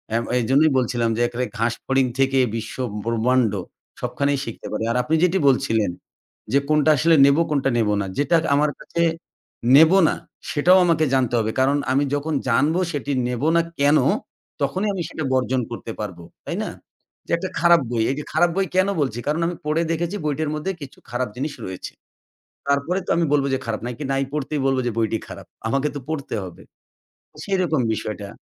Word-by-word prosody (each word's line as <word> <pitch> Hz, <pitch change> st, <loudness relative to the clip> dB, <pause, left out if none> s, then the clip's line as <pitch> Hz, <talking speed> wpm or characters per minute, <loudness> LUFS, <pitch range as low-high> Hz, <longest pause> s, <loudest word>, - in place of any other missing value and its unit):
আম 115 Hz, -, +1 dB, 0.2 s
এইজন্যই 140 Hz, +6 st, +3 dB
বলছিলাম 120 Hz, -2 st, +1 dB
যে -, -, 0 dB
এখানে 120 Hz, +1 st, -3 dB
ঘাসফড়িং 125 Hz, +4 st, 0 dB
থেকে 135 Hz, 0 st, +3 dB, 0.2 s
বিশ্ব 115 Hz, -, -5 dB, 0.3 s
ব্রহ্মাণ্ড, 115 Hz, -1 st, +2 dB, 0.5 s
সবখানেই 140 Hz, -1 st, -1 dB
শিখতে 115 Hz, -, -7 dB
পারি। 105 Hz, -, -2 dB
আর 125 Hz, -, 0 dB
আপনি 155 Hz, +5 st, +1 dB
যেটি 180 Hz, +1 st, +3 dB
বলছিলেন 115 Hz, -7 st, +2 dB, 0.6 s
যে, 140 Hz, -, +5 dB
কোনটা 155 Hz, 0 st, +4 dB
আসলে 165 Hz, +5 st, +4 dB
নেবো, 140 Hz, +4 st, +4 dB
কোনটা 140 Hz, -2 st, +1 dB
নেব 110 Hz, -2 st, +2 dB
না। -, -, -2 dB
যেটা 145 Hz, +4 st, +3 dB, 0.2 s
আমার 150 Hz, +1 st, +2 dB
কাছে 170 Hz, -, -3 dB, 0.7 s
নেব 160 Hz, +4 st, +8 dB, 0.2 s
না, -, -, -1 dB, 0.4 s
সেটাও 180 Hz, +5 st, +5 dB
আমাকে 165 Hz, -2 st, +3 dB
জানতে 125 Hz, -3 st, +1 dB
হবে। 110 Hz, 0 st, 0 dB
কারণ 140 Hz, +2 st, +3 dB
আমি 140 Hz, +2 st, +3 dB
যখন 150 Hz, +2 st, -2 dB, 0.2 s
জানব 145 Hz, +7 st, +2 dB, 0.2 s
সেটি 145 Hz, -1 st, -3 dB, 0.2 s
নেব 125 Hz, 0 st, -3 dB, 0.2 s
না -, -, +5 dB, 0.2 s
কেন, 145 Hz, +2 st, +5 dB, 0.6 s
তখনই 185 Hz, +10 st, 0 dB
আমি 190 Hz, -, -3 dB
সেটা 160 Hz, -, -5 dB
বর্জন 130 Hz, 0 st, +1 dB
করতে 115 Hz, -1 st, -6 dB
পারবো। 95 Hz, -5 st, -6 dB, 0.2 s
তাই -, -, -3 dB
না? -, -, -4 dB, 0.6 s
যে -, -, -7 dB
একটা 185 Hz, +2 st, -4 dB
খারাপ 170 Hz, -2 st, +5 dB
বই। 115 Hz, -2 st, +1 dB
এই -, -, -2 dB
যে -, -, -5 dB
খারাপ 175 Hz, +2 st, +4 dB
বই 195 Hz, -, +2 dB
কেন 185 Hz, +1 st, +4 dB
বলছি? 125 Hz, -4 st, -1 dB
কারণ 155 Hz, +3 st, 0 dB
আমি 175 Hz, -, -3 dB
পড়ে 155 Hz, +2 st, +1 dB
দেখেছি 170 Hz, +4 st, -2 dB
বইটার 150 Hz, +1 st, -1 dB
মধ্যে 170 Hz, +6 st, -2 dB
কিছু 140 Hz, -2 st, -9 dB
খারাপ 125 Hz, 0 st, -1 dB
জিনিস 145 Hz, +3 st, -3 dB
রয়েছে। 95 Hz, -1 st, -7 dB, 0.7 s
তারপরে 140 Hz, +6 st, +1 dB
তো -, -, -8 dB
আমি 170 Hz, -, +2 dB
বলব 140 Hz, -2 st, +3 dB
যে 130 Hz, -, +1 dB
খারাপ, 115 Hz, -2 st, -3 dB
না 125 Hz, -, -3 dB
কি 150 Hz, -, -6 dB
নাই 135 Hz, 0 st, +1 dB
পড়তেই 150 Hz, -1 st, -2 dB
বলব 135 Hz, -1 st, +2 dB
যে 120 Hz, -, 0 dB
বইটি 110 Hz, 0 st, +1 dB
খারাপ? -, -, -10 dB, 0.2 s
আমাকে 135 Hz, +5 st, +1 dB
তো -, -, -3 dB
পড়তে 145 Hz, -6 st, -3 dB
হবে। 90 Hz, -, -11 dB, 0.8 s
সেরকম 180 Hz, -7 st, 0 dB
বিষয়টা। 105 Hz, -1 st, -5 dB
140 Hz, 185 wpm, -22 LUFS, 120-155 Hz, 0.8 s, নেব